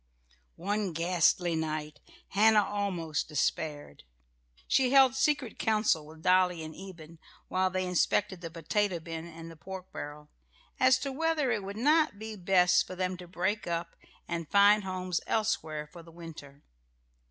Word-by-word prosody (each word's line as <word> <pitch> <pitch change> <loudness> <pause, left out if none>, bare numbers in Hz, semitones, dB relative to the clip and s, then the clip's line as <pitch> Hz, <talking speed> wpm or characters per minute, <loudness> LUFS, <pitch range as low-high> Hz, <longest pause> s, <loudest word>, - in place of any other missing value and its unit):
One 200 0 -2
ghastly 170 +1 +2
night 155 -1 -3 0.3
Hannah 210 +1 +4
almost 185 -7 -2
despaired. 150 - -2 0.7
She 260 -2 +3
held 270 -1 +6
secret 280 -4 0
council 215 -8 +1
with 160 +1 -14
Dolly 180 -2 +3
and 155 0 -7
Eben, 170 -4 -11 0.3
while 185 0 +1
they 185 0 -2
inspected 185 +1 +1
the 165 - -5
potato 175 +3 -1
bin 165 0 -7
and 165 0 -10
the - - -12
pork 190 +3 -9
barrel, 150 0 -8 0.5
as 255 0 +5
to 275 0 -3
whether 305 -2 0
it 210 - 0
would 200 +2 -7
not 300 0 +3
be 220 +1 -7
best 180 -2 +3
for 185 - -7
them 185 0 -2
to 180 -1 -11
break 190 +4 -2
up 170 0 -3 0.3
and 170 -3 -4
find 205 +1 +5
homes 185 -2 -2
elsewhere 160 -9 -1
for 170 +3 -13
the 165 0 -15
winter. 155 -4 -11
180 Hz, 155 wpm, -30 LUFS, 165-210 Hz, 0.7 s, held